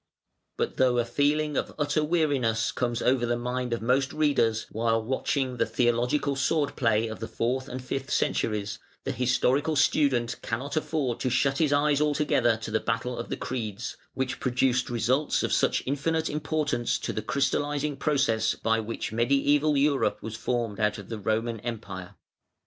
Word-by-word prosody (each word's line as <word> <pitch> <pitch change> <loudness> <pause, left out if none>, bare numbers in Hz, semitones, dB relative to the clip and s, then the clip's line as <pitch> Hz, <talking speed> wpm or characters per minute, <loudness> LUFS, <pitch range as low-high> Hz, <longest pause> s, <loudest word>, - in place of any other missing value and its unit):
But - - -2
though 125 -1 +3
a 120 - +2
feeling 145 +4 +1
of - - -2
utter 150 0 +1
weariness 140 -9 +1
comes 120 -2 -2
over 125 -1 +3
the 120 0 +1
mind 125 +1 -3
of 115 -1 -2
most 130 +3 +2
readers, 115 -7 +2
while 115 +1 +1
watching 130 +1 -1
the - - +2
theological 120 +5 +1
sword 145 +2 0
play 115 -2 +2
of 110 -1 -6
the 110 - -4
fourth 130 +4 -1
and 130 0 -6
fifth 135 +1 -3
centuries, 105 -1 0 0.2
the - - -2
historical 130 +5 +1
student 135 -5 +2
cannot 135 +6 -3
afford 150 -6 -1
to 130 - 0
shut 135 +2 +1
his 155 -3 +2
eyes 145 0 +3
altogether 145 -6 +2
to 110 0 -6
the 110 - +2
battle 115 +4 -2
of 115 - -6
the - - -3
creeds, 115 -3 -4 0.2
which 130 -1 -2
produced 130 0 +1
results 125 +5 +1
of - - 0
such - - +2
infinite 160 +4 0
importance 150 -5 -1
to - - -4
the 110 - -2
crystallising 145 +4 0
process 135 -6 +1
by 115 0 +1
which 110 0 -4
Mediæval 140 +5 +2
Europe 140 -1 +2
was 110 0 -5
formed 115 -2 -2
out 105 -1 +1
of 100 -2 -10
the 115 -2 -4
Roman 110 +2 -1
Empire. 100 -6 -6
125 Hz, 170 wpm, -27 LUFS, 115-145 Hz, 0.2 s, though